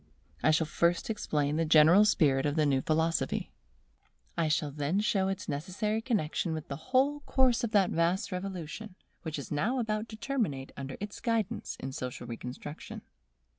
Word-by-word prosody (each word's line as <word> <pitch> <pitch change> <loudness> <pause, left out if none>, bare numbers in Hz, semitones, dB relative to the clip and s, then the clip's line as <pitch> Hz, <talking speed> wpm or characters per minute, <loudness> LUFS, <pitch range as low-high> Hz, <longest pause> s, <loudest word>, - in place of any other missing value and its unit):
I - - +4
shall 155 +1 +3
first 170 +5 +1
explain 150 -8 -1
the 165 - +2
general 160 +6 +7
spirit 145 -8 +3
of 145 - -1
the 155 -2 +3
new 135 -2 +2
philosophy. 160 +2 0 0.8
I 165 -2 +1
shall 155 -1 0
then 145 +6 0
show 195 -2 +1
its 195 -1 -3
necessary 195 +9 -2
connexion 190 -8 -1
with 155 -2 -6
the 140 - -3
whole 275 +3 +3
course 260 -3 +2
of 235 - 0
that 200 -3 +4
vast 170 +4 +1
revolution 185 +1 -5 0.3
which 160 -3 -4
is 140 - -7
now 210 - 0
about 220 -2 -1
to 220 - -7
terminate 215 - -2
under 135 -1 -6
its 205 0 -6
guidance 230 -4 -1
in 135 - -5
social 125 -1 -5
reconstruction. 125 +5 -7
170 Hz, 170 wpm, -30 LUFS, 150-215 Hz, 0.8 s, general